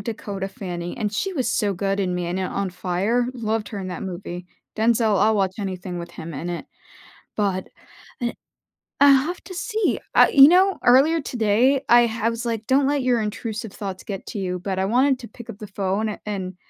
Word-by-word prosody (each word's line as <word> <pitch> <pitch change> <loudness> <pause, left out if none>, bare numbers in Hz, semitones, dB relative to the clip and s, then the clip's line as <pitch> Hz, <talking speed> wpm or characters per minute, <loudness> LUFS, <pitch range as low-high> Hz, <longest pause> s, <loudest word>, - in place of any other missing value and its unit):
Dakota 200 -4 -5
Fanning, 175 -5 -6
and 210 -2 -1
she 385 - -2
was 265 -7 -1
so 205 -2 +1
good 195 +2 -1
in 180 -2 -1
Man 175 +1 -2
uh, 185 - -1
On 195 -2 -2
Fire, 190 +7 0
loved 220 -3 -2
her 205 - -6
in 185 -1 -5
that 180 - -5
movie, 180 -1 -6 0.3
Denzel, 220 -2 +3
I'll 215 +1 +4
watch 190 -2 0
anything 185 -3 -4
with 170 0 -7
him 165 0 -8
in 165 +6 -4
it, 175 - -5 0.7
but, 195 -3 -1 0.5
I'd 240 -1 -2 0.7
I'll 275 -1 +6
have 355 - -5
to 370 - -8
see, 430 +4 -1
I - - +7
you 275 0 +9
know, 370 +4 +4
earlier 280 +7 +5
today, 245 +2 +2
I 240 0 +7
ha 225 0 -1
was 230 +1 -4
like, 225 -2 -3
"Don't 270 +1 +3
let 285 0 +1
your 250 -2 +2
intrusive 220 0 -4
thoughts 190 -2 -6
get 195 -2 -6
to - - -6
you," 180 -2 -2
but 190 +1 -3
I 190 - +1
wanted 260 +5 +3
to 240 - -8
to - - -28
pick 235 - -12
up - - -7
the 215 - -8
phone 195 +2 -1
a 210 - -6
and, 190 -3 -4
210 Hz, 210 wpm, -23 LUFS, 190-245 Hz, 0.7 s, you